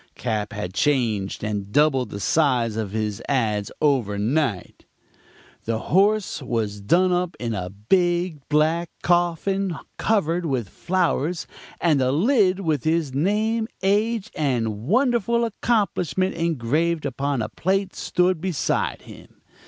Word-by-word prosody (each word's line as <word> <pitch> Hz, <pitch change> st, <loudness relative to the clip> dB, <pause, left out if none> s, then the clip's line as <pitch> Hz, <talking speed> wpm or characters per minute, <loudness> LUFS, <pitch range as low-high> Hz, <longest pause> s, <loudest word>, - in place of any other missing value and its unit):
Cap. 110 Hz, -4 st, -2 dB
had 105 Hz, -5 st, -5 dB
changed 115 Hz, -9 st, 0 dB
and 105 Hz, -2 st, -3 dB
doubled 135 Hz, -3 st, +3 dB
the 100 Hz, -, -6 dB
size 125 Hz, -4 st, +2 dB
of 110 Hz, -3 st, -2 dB
his 105 Hz, -1 st, -2 dB
ads. 110 Hz, -7 st, 0 dB
over 130 Hz, -9 st, +1 dB
night. 115 Hz, -, -1 dB, 0.8 s
"The 115 Hz, 0 st, 0 dB, 0.2 s
horse 205 Hz, -1 st, +3 dB
was 110 Hz, -5 st, -2 dB
done 180 Hz, -, +3 dB
up 180 Hz, -1 st, -1 dB
in 115 Hz, -2 st, -2 dB
a 90 Hz, -3 st, -3 dB
big 175 Hz, -, 0 dB
black 160 Hz, +3 st, +2 dB
coffin 175 Hz, +1 st, +1 dB, 0.2 s
covered 175 Hz, -5 st, +1 dB
with 125 Hz, -8 st, -2 dB
flowers; 175 Hz, -, -1 dB, 0.3 s
and 155 Hz, -6 st, +2 dB
the 130 Hz, 0 st, +2 dB
lid 195 Hz, -, +3 dB
with 155 Hz, -7 st, 0 dB
his 160 Hz, -4 st, 0 dB
name, 215 Hz, +9 st, +1 dB, 0.2 s
age 215 Hz, +2 st, +1 dB
and 115 Hz, -6 st, -1 dB
wonderful 235 Hz, -, +2 dB
accomplishment 195 Hz, -5 st, 0 dB
engraved 165 Hz, 0 st, 0 dB
upon 140 Hz, -2 st, -1 dB
a -, -, -4 dB
plate 190 Hz, +1 st, -1 dB
stood 180 Hz, -2 st, +1 dB
beside 180 Hz, -5 st, -1 dB
him. -, -, -15 dB
155 Hz, 130 wpm, -23 LUFS, 115-185 Hz, 0.8 s, doubled